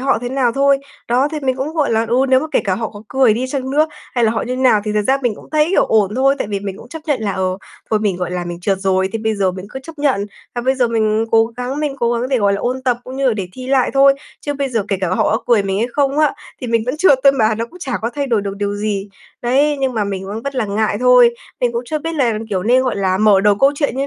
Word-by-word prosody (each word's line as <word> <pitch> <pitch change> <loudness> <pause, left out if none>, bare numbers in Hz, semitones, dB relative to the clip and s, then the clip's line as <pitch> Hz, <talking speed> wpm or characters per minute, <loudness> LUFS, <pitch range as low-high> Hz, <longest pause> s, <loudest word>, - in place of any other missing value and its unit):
họ 270 -2 +1
thế 245 - -2
nào 255 -3 +1
thôi. 275 0 +3 0.3
Đó, 255 +4 +2
thì 305 - -3
mình 260 -2 0
cũng, 265 +3 -2
gọi 300 -3 +1
là 225 +1 +2
ừ, 240 - +1
nếu 260 0 +4
mà 310 - -3
kể - - +3
cả 190 -2 +1
họ 225 +2 -3
có 205 0 -11
cười 255 -4 +3
đi 255 +3 -2
chăng 265 -1 -3
nữa 305 +3 +3 0.3
hay 240 -2 +2
là 220 - +3
họ 225 - -1
như 250 - -4
thế 260 - -2
nào 230 -5 +4
thì 210 - -2
thật 210 0 +1
ra 270 +1 +3
mình 240 -4 0
cũng - - -15
thấy, 305 0 +3
kiểu, - - +3
ổn 210 -2 +2
thôi. 270 +2 +3
Tại - - -3
vì 200 -1 -2
mình 195 -1 -5
cũng 240 - -13
chấp 320 - -7
nhận 280 -6 0
là, 205 -2 -1
ờ, 185 0 -1 0.3
thôi 215 - +3
mình, 205 -4 0
gọi 180 -1 -3
là, 180 -1 -3
mình 175 0 -6
trượt 195 0 0
rồi 190 -1 +1
thì 225 - -2
bây 220 0 -1
giờ 195 -2 +1
mình 185 +1 -8
cứ 265 - -7
chấp 320 +1 -12
nhận, 260 -9 +1 0.3
và 240 - -2
bây 260 +2 +2
giờ 245 -3 +1
mình 220 -1 +1
cố 225 0 +4
gắng 255 +4 -3
mình 290 -3 -2
cố 235 0 +2
gắng 240 +2 -1
để, 260 -2 +1
gọi 200 -1 +2
là, 200 - -1
ôn 255 +2 -2
tập 250 -2 +1
cũng 260 +1 -8
như 275 - 0
là - - +2
để 190 -4 -4
thi 255 0 -8
lại 265 -2 +2
thôi. 275 0 +6 0.3
Chứ 290 - -3
bây 280 -1 -2
giờ 225 -5 -1
kể 195 - 0
cả 185 - 0
họ 185 - +1
có - - -7
cười 230 -4 +4
mình 195 0 -2
hay 230 - +1
không 280 0 +1
á, 305 -2 +3 0.3
thì 250 - -4
mình 230 -1 +1
vẫn 255 +4 -1
trượt 300 -5 +4
thôi 275 - +7
mà, 220 -5 +2
nó 225 +2 -2
cũng 360 - -15
chả 275 -7 -5
có 230 - -1
thay 285 -1 -2
đổi 230 -5 +1
được 200 0 -5
điều 205 0 -2
gì. 205 -1 -2 0.3
Đấy, 280 +5 +2
nhưng 260 -2 0
mà 215 - 0
mình 195 -1 -4
vẫn 210 +3 -5
vất 280 +1 -4
là 250 -4 0
ngại 205 +1 0
thôi, 250 -1 +6 0.3
mình 245 -1 +1
cũng 235 - -2
chưa 310 +5 -2
biết 325 +2 -4
là, 235 -7 +1
kiểu, 185 -2 -1
nên, 250 +5 +3
gọi 255 -4 -1
là, 190 -1 0
mở 210 -2 +5
đầu 205 +1 +4
câu 275 +1 +5
chuyện 285 -4 -1
như 275 +1 -1
240 Hz, 320 wpm, -18 LUFS, 205-270 Hz, 0.3 s, thôi